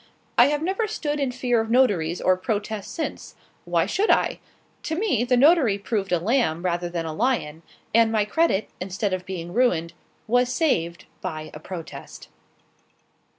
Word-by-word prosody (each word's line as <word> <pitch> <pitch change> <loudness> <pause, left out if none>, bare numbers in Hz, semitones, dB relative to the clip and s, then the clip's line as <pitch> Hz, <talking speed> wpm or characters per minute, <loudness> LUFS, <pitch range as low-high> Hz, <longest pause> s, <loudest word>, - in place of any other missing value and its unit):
I - - +7
have 295 +1 -1
never 390 +5 0
stood 300 -9 -3
in 275 -3 0
fear 245 -2 +1
of 225 - -5
notaries 200 -10 +2
or 185 - +3
protests 205 +1 -3
since. 325 - -5 0.3
Why - - +1
should 415 +3 0
I? - - +2 0.4
To 320 - -3
me 345 - +1
the 250 0 +2
notary 275 - +5
proved 200 -1 -3
a 175 - +4
lamb 175 -4 0
rather 175 0 -1
than 170 -1 -3
a 160 - -4
lion, 165 -8 -1 0.3
and 225 0 +5
my 215 -2 +2
credit, 220 -3 +1
instead 190 +2 -2
of 185 0 -4
being 175 -2 -5
ruined, 175 -9 +1 0.3
was 245 +2 +2
saved 170 - 0 0.2
by 155 -1 -5
a 150 - -8
protest. 170 0 -9
215 Hz, 165 wpm, -24 LUFS, 175-260 Hz, 0.4 s, I